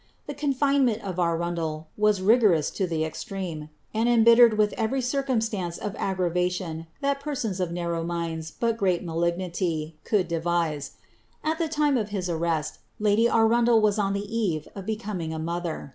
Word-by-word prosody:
The 290 - -5
confine' 280 -1 +2
ineni 220 -2 0
of 185 -3 -5
Arundel 165 -2 -1
was 210 -2 +2
rigorous 205 - +4
in 190 - +1
ihe 160 -1 0
exireme. 165 -3 -6 0.2
and 225 +2 +1
embhtered 235 -1 +6
with 210 -1 +2
every 230 +4 -1
circumstance 230 -9 -1
of 210 -1 -5
aggravation 180 -3 -1
that 280 0 0
persons 260 -10 -3
of 180 -2 -1
narrow 170 -1 -2
miiids, 165 -2 -3
but 230 -1 +1
grcJi 185 -4 +1
malignity, 170 -1 -2
could 200 -5 +1
devise. 165 -3 -1 0.5
At 315 +1 -1
the 325 -3 -1
lime 295 -3 +3
of 215 -3 -2
his 185 -4 -2
arrest, 160 -2 -1 0.2
lady 215 +2 +3
Aruudel 230 +1 +4
was 215 -1 +2
on 195 -1 +1
the 200 +1 -2
eve 175 -10 -1
of 195 -1 -8
becoming 205 -7 -3
a - - -4
mother. 170 -1 -4
190 Hz, 160 wpm, -26 LUFS, 170-225 Hz, 0.5 s, embhtered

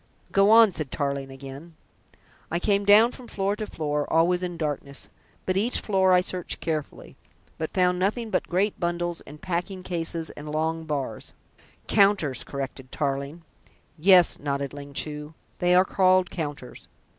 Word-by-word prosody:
"Go 195 +1 +4
on," 225 -1 +7
said 155 -5 -4
Tarling 140 -1 -2
again. 135 +5 -10 0.7
"I 170 - -1
came 200 +2 +1
down 215 +4 +7
from 250 -1 -12
floor 200 -1 -1
to 215 -1 -4
floor, 150 -4 -2
always 170 +3 +3
in 175 -2 -4
darkness, 145 -3 -4 0.4
but 185 - 0
each 220 +6 +1
floor 190 -2 +2
I 180 0 +6
searched 180 -1 -3
carefully, 155 -3 -5 0.4
but 160 - -2
found 180 -1 +1
nothing 215 +4 -1
but - - 0
great 195 +4 0
bundles 175 -1 -2
and 150 +1 -11
packing 185 +2 -3
cases 165 -2 -3
and 150 +1 -8
long 160 +1 -1
bars 140 -7 -4 0.3
" - - -28
"Counters," 195 - +3
corrected 135 -1 -6
Tarling. 140 +3 -3 0.5
"Yes," 180 +1 +5
nodded 140 -1 -3
Ling 140 0 -9
Chu, 150 +1 -4 0.2
"they 180 0 +3
are 185 +1 +6
called 185 -1 +3
counters. 145 -6 -6
170 Hz, 155 wpm, -25 LUFS, 145-185 Hz, 0.7 s, on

